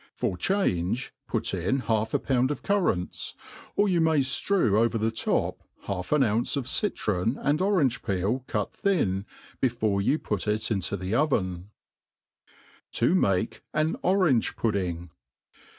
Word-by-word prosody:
For -, -, -1 dB
change, 115 Hz, -, 0 dB
put -, -, -1 dB
in 135 Hz, 0 st, 0 dB
half 110 Hz, -2 st, 0 dB
a -, -, +6 dB
pound 130 Hz, -1 st, +1 dB
of 150 Hz, -, -4 dB
currants; 180 Hz, -, -1 dB, 0.4 s
or 205 Hz, -, +3 dB
you 175 Hz, -3 st, +2 dB
may 160 Hz, -3 st, +3 dB, 0.3 s
Arew 115 Hz, -, +3 dB
over 115 Hz, 0 st, +2 dB
the 110 Hz, +1 st, 0 dB
top 110 Hz, -, -1 dB, 0.2 s
half 90 Hz, -2 st, -4 dB
an 150 Hz, -2 st, +4 dB
ounce 115 Hz, +3 st, 0 dB
of 130 Hz, -3 st, -3 dB
citron 110 Hz, -, 0 dB
and 145 Hz, +3 st, +1 dB
orange 180 Hz, -, +2 dB
peel 100 Hz, +6 st, -1 dB
cut 105 Hz, -3 st, -2 dB
Ihin, 100 Hz, -, +1 dB, 0.3 s
before 110 Hz, -6 st, +1 dB
jrou 145 Hz, +10 st, +1 dB
put 105 Hz, -3 st, -2 dB
it 105 Hz, +2 st, 0 dB
into 100 Hz, -1 st, -1 dB
the 95 Hz, +2 st, -4 dB
oven« 95 Hz, -, 0 dB, 1.2 s
To 120 Hz, +8 st, +2 dB
majti 100 Hz, -, +1 dB, 0.2 s
an 155 Hz, +2 st, +2 dB
Orang€^Pud£ng. 110 Hz, -, +1 dB
115 Hz, 140 wpm, -27 LUFS, 100-150 Hz, 1.2 s, a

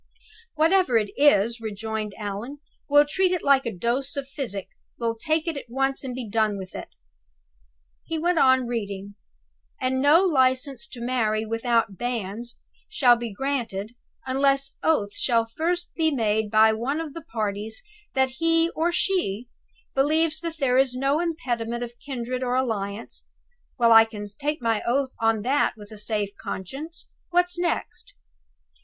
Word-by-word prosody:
"Whatever 320 Hz, -4 st, +4 dB
it 210 Hz, -2 st, 0 dB
is," 235 Hz, -5 st, +4 dB
rejoined 220 Hz, -1 st, -4 dB
Allan, 210 Hz, +6 st, -5 dB, 0.3 s
"we'll 290 Hz, +1 st, +6 dB
treat 370 Hz, +4 st, +2 dB
it 360 Hz, -3 st, -1 dB
like 275 Hz, -3 st, +4 dB
a -, -, -1 dB
dose 240 Hz, +8 st, -2 dB
of 275 Hz, -1 st, -3 dB
physic 250 Hz, -9 st, -4 dB, 0.3 s
we'll 230 Hz, -1 st, -1 dB
take 315 Hz, +7 st, -1 dB
it 330 Hz, -, -1 dB
at 275 Hz, -4 st, -7 dB
once, 270 Hz, +3 st, 0 dB
and 255 Hz, -2 st, -4 dB
be 250 Hz, -3 st, -5 dB
done 215 Hz, -1 st, +1 dB
with 190 Hz, -1 st, -8 dB
it." -, -, -6 dB, 1.2 s
He 325 Hz, -, -2 dB
went 345 Hz, +1 st, +1 dB
on 260 Hz, -2 st, +5 dB
reading: 205 Hz, -4 st, -4 dB, 0.7 s
"'And 260 Hz, 0 st, 0 dB
no 300 Hz, +6 st, +6 dB
license 260 Hz, -6 st, +2 dB
to 240 Hz, -, -10 dB
marry 225 Hz, -3 st, 0 dB
without 225 Hz, -2 st, 0 dB
banns 235 Hz, -1 st, -4 dB, 0.3 s
shall 260 Hz, -, +5 dB
be 235 Hz, -1 st, -5 dB
granted, 230 Hz, -3 st, -3 dB, 0.3 s
unless 275 Hz, +1 st, +1 dB
oath 210 Hz, -11 st, +1 dB
shall 230 Hz, -3 st, +2 dB
be 225 Hz, -, -25 dB
first 350 Hz, +2 st, -1 dB
made 220 Hz, -10 st, +1 dB
by 220 Hz, +1 st, +5 dB
one 255 Hz, +8 st, -2 dB
of 320 Hz, -3 st, -5 dB
the 330 Hz, -, -7 dB
parties 220 Hz, -5 st, -3 dB, 0.3 s
that 265 Hz, 0 st, +3 dB
he 330 Hz, 0 st, +3 dB
or 335 Hz, +2 st, 0 dB
she 250 Hz, -, 0 dB, 0.4 s
believes 310 Hz, +3 st, +2 dB
that 330 Hz, -1 st, -5 dB
there 260 Hz, -3 st, +3 dB
is 265 Hz, -2 st, +2 dB
no 275 Hz, +4 st, +1 dB
impediment 245 Hz, -9 st, -2 dB
of 240 Hz, 0 st, -6 dB
kindred 255 Hz, -2 st, -4 dB
or 250 Hz, -1 st, 0 dB
alliance' 220 Hz, -5 st, -3 dB, 0.5 s
well, 235 Hz, -2 st, +4 dB
I 225 Hz, 0 st, +9 dB
can 210 Hz, -2 st, -8 dB
take 290 Hz, +5 st, -3 dB
my 225 Hz, -2 st, +1 dB
oath 260 Hz, +2 st, 0 dB
of 225 Hz, -2 st, +2 dB
that 275 Hz, +5 st, +2 dB
with 205 Hz, 0 st, -12 dB
a 215 Hz, -, -9 dB
safe 210 Hz, -1 st, -2 dB
conscience! 275 Hz, -, -6 dB, 0.2 s
What 355 Hz, 0 st, +3 dB
next? 350 Hz, -1 st, -2 dB
250 Hz, 160 wpm, -25 LUFS, 220-290 Hz, 1.2 s, I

